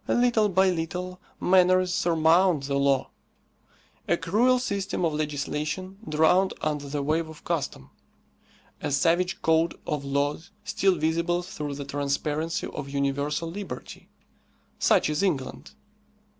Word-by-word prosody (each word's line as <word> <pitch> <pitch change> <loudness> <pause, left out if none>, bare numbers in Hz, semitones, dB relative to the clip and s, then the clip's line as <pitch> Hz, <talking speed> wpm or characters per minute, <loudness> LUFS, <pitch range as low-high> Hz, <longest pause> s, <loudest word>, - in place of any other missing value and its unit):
Little 235 -3 +3
by 190 0 +3
little 180 +2 -4 0.2
manners 185 0 +4
surmount 165 -1 +3
the 140 0 -3
law. 140 -1 +1 1.0
A 170 - +2
cruel 240 +10 +3
system 200 -7 -2
of 160 - 0
legislation 150 +5 -3
drowned 160 +5 +3
under 150 -2 -2
the 145 0 -2
wave 160 +2 0
of 160 0 -12
custom; 135 - -3 0.9
a - - -2
savage 170 +6 +1
code 160 +1 +2
of 150 -2 -2
laws 145 +3 -1
still 195 -2 +2
visible 170 +2 0
through 150 -7 -5
the 140 0 -6
transparency 145 +3 -2
of 140 - -6
universal 140 +3 -1
liberty: 200 +2 -8 0.7
such - - +4
is 150 +3 -1
England. 160 -10 -2
165 Hz, 125 wpm, -26 LUFS, 145-185 Hz, 1.0 s, manners